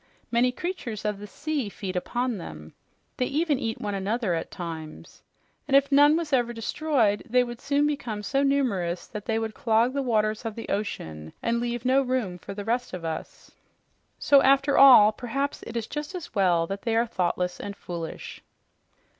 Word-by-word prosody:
Many 245 +1 +3
creatures 250 - -5
of 210 -1 -1
the 205 - -8
sea 285 +1 -3
feed 190 -1 -6
upon 240 +4 -2
them. 75 - -9 0.4
They 250 - 0
even 300 -1 +1
eat 225 -1 -3
one 205 -1 -3
another 200 +1 -1
at 165 - -3
times. 160 -3 -8 0.5
And 275 -1 +6
if 280 +1 +2
none 290 +2 +6
was 325 -4 -3
ever 240 -2 +2
destroyed, 230 -2 0
they 250 +2 +4
would 240 -1 -7
soon 285 +1 +1
become 245 -8 -3
so 275 +6 0
numerous 230 -12 0
that 210 -1 -8
they 225 - +1
would 225 -1 -2
clog 230 +3 +2
the 280 - 0
waters 215 -4 0
of 225 -2 -4
the 230 - -7
ocean 80 - -4
and 235 0 +1
leave 240 0 -3
no 260 +2 +4
room 250 -9 -2
for 195 - -8
the 205 0 -6
rest 245 0 -1
of 175 -2 -5
us. 160 -1 -6 0.7
So 280 -1 +5
after 275 +1 +4
all, 250 -6 +9
perhaps 275 +6 -3
it - - -5
is 225 - -2
just 295 - -5
as 355 - -7
well 180 -5 +3
they 200 +5 -2
are 230 +1 +3
thoughtless 180 -4 -1
and 200 0 -6
foolish." 170 -4 -7
230 Hz, 185 wpm, -26 LUFS, 200-275 Hz, 0.7 s, all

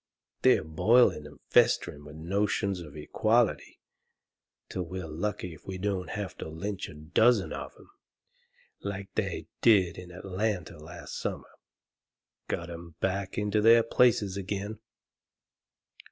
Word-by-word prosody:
They're - - +5
boilin' 80 +1 +3
and 70 -3 -15
festerin' 75 0 +3
with 75 +1 -10
notions 100 +3 0
of 75 -3 -10
equality 110 - +1 0.9
till 95 - -4
we're 90 +1 -5
lucky 85 +3 -3
if 80 - -16
we 95 -1 -4
don't 95 -1 -2
have 105 -2 -4
to - - -5
lynch 95 +5 -4
a - - -11
dozen 95 +8 +3
of - - -6
'em, - - -18 0.9
like 100 -1 -5
they - - -2 0.2
did 95 -7 +4
in 90 -1 -10
Atlanta 95 -1 -3
last 85 +3 -8
summer, - - -4 1.0
to - - +2
get 85 0 -7
'em 85 -1 -9
back 95 0 -2
into 105 0 +1
their 115 +1 +7
places 110 -5 +3
again. 100 +2 -4
95 Hz, 135 wpm, -29 LUFS, 85-105 Hz, 1.0 s, their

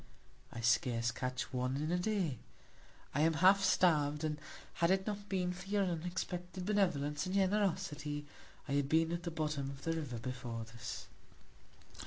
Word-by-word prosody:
I 115 - -6
scarce 120 -1 +2
catch 125 +1 -3
one 125 +1 0
in 155 +3 -1
a 180 - +2
Day; 180 - 0 0.7
I 145 - +2
am 160 +1 +4
half 190 +5 +6
starv'd; 150 -6 +3
and 150 -1 -1 0.4
had 170 - +5
it 190 0 +3
not 205 -1 -4
been 180 -2 0
for 180 +1 -9
your 205 -1 +3
unexpected 180 +1 -3
Benevolence 175 -7 +1
and 185 - -2
Generosity, 185 -7 0 0.4
I - - -5
had 140 -1 +1
been 160 +1 +3
at 170 0 -2
the 175 - -3
Bottom 150 -4 -2
of 140 -1 -9
the 165 - 0
River 145 -7 -3
before 120 -2 -4
this. 115 +1 -7
160 Hz, 165 wpm, -35 LUFS, 140-185 Hz, 0.7 s, half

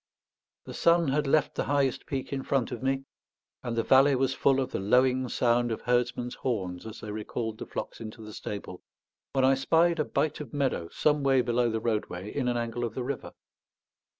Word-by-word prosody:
The - - -8
sun 170 -2 +3
had 145 +1 +1
left 150 +1 +2
the - - -2
highest 140 -3 0
peak 135 0 -3
in 135 - -2
front 135 -3 0
of 125 - -5
me, 135 +1 0 0.6
and 120 -2 -3
the 115 - +1
valley 135 +1 +5
was 135 0 +1
full 135 -1 +3
of 130 - -2
the - - -2
lowing 125 +5 +3
sound 120 0 +2
of 110 - -3
herdsmen's 125 0 0
horns 95 -6 -3
as 110 - -9
they 105 - -6
recalled 110 +1 -4
the - - -6
flocks - - -6
into 110 0 -8
the 105 0 -9
stable, 100 -4 -6 0.5
when 135 -1 +3
I 135 - +5
spied 165 +5 +3
a - - +3
bight 155 +1 -1
of 145 -3 -7
meadow 130 -12 0
some 150 -1 +1
way 135 -2 +4
below 120 0 +1
the 110 0 -1
roadway 105 -4 -3
in 130 -3 0
an 120 -1 +1
angle 120 0 -3
of 115 -2 -3
the 130 - -2
river. 135 +1 -5
125 Hz, 205 wpm, -28 LUFS, 115-135 Hz, 0.6 s, valley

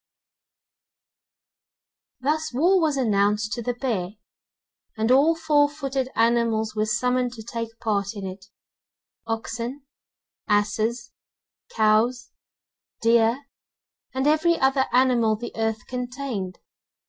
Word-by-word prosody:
Thus 310 +3 0
war 355 +7 +4
was 305 -3 +1
announced 210 -3 +1
to 235 - -3
the 245 +1 -2
Bear, 215 -8 -2 0.8
and 220 +2 +1
all 290 +6 +5
four 300 -3 +3
footed 275 -3 -3
animals 225 -1 +1
were 215 0 0
summoned 250 +2 0
to 225 -2 -9
take 230 0 -6
part 205 -2 -1
in 200 -1 -6
it, 190 +1 -8 0.8
oxen, 230 +4 -4 0.6
asses, 220 +3 0 0.6
cows, 230 +3 +2 0.7
deer, 230 +4 +3 0.7
and 265 +1 -2
every 315 +3 +3
other 265 0 +2
animal 245 -3 +3
the 240 +3 -7
earth 225 -1 -2
contained. 250 -7 -5
235 Hz, 105 wpm, -24 LUFS, 220-265 Hz, 0.8 s, all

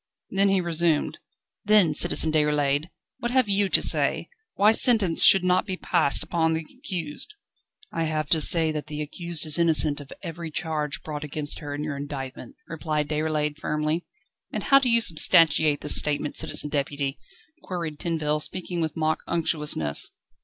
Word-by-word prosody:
Then 195 +1 +2
he 195 -1 +1
resumed: 170 -2 -1 0.4
"Then, 205 -7 +3
Citizen 155 +1 +4
Déroulède, 150 -1 0 0.3
what 240 - -3
have 255 -2 +1
you 200 0 0
to - - +3
say, - - +1 0.3
why 205 +2 +4
sentence 220 -7 +5
should 190 -2 +7
not 185 +2 +1
be 185 -2 -4
passed 165 -7 +1
upon 160 -2 -1
the 160 0 -4
accused?" 180 - -2 0.6
"I 165 - -3
have 155 -1 -3
to 160 - +3
say 160 0 +4
that 150 -1 -6
the 150 -1 -7
accused 170 +1 -3
is 155 +2 +4
innocent 155 -3 +2
of 140 - -14
every 165 -1 -7
charge 155 -2 -4
brought 150 -1 -6
against 150 0 -3
her 145 -2 -7
in 145 - -5
your 150 -2 -5
indictment," 140 - -8
replied 155 -2 -4
Déroulède 150 -1 -2
firmly. 155 +2 -2 0.5
"And - - -5
how 275 - +5
do 260 -2 -1
you 235 0 +4
substantiate 160 -5 +3
this 150 - +4
statement, 150 0 -2
Citizen 150 - +1
Deputy?" 140 -1 -3 0.4
queried 165 -5 -6
Tinville, 155 -3 -2
speaking 175 +1 -3
with 160 -1 -4
mock 155 0 -1
unctuousness. 150 - -1
160 Hz, 165 wpm, -24 LUFS, 150-175 Hz, 0.6 s, should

